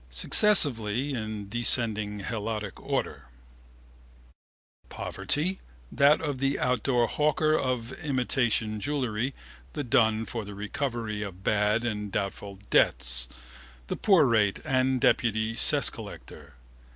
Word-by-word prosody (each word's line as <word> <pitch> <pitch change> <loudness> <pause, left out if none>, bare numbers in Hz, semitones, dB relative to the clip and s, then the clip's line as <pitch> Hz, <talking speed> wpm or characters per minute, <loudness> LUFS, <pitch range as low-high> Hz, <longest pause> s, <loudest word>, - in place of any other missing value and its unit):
Successively, 130 - +2
in 110 -4 -4
descending 110 -2 0
helotic 105 -2 -3
order: 70 -2 -3 1.6
Poverty: 150 - -2 0.3
that 140 +2 +4
of 145 -4 -3
the 135 +1 0
outdoor 125 -1 +1
hawker 155 +4 +1
of 130 -3 -2
imitation 120 -6 0
jewellery, 130 -1 -2 0.4
the 145 - -3
dun 115 -4 +2
for 110 +2 -5
the 100 0 -9
recovery 110 0 -3
of 95 -2 -7
bad 105 +3 +1
and 105 -3 -3
doubtful 100 0 -4
debts, - - +3 0.6
the - - -1
poor 190 -8 +4
rate 110 -5 +2
and 130 -2 +1
deputy 110 -2 +2
cess - - +1
collector. 75 -3 -11
115 Hz, 110 wpm, -27 LUFS, 105-130 Hz, 1.6 s, that